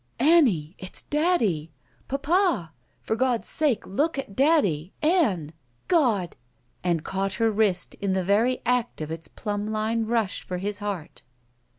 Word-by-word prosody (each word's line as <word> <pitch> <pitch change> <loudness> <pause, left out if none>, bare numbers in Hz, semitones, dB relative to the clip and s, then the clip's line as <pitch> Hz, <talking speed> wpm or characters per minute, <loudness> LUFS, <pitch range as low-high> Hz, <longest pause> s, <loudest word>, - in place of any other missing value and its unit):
"Annie, 240 - +4
it's 185 - -5
daddy! 260 - +1 0.4
Papa! 285 - +1 0.3
For 220 - -1
God's 245 -1 0
sake 295 -9 +1
look 290 - 0
at 230 -8 -5
daddy 205 - +2
— - - -37 0.2
Ann! 165 - -2 0.3
God!" 235 - +2 0.5
And 170 -3 0
caught 195 0 -2
her 225 -1 +2
wrist 200 -5 +1
in 200 -1 0
the 190 -1 0
very 220 +7 +2
act 245 -1 0
of 155 0 -5
its 165 0 -6
plumb 205 -1 -4
line 220 +1 -1
rush 225 -4 0
for 180 - -5
his 205 +2 -3
heart. 200 -6 -5
210 Hz, 150 wpm, -25 LUFS, 185-260 Hz, 0.5 s, Annie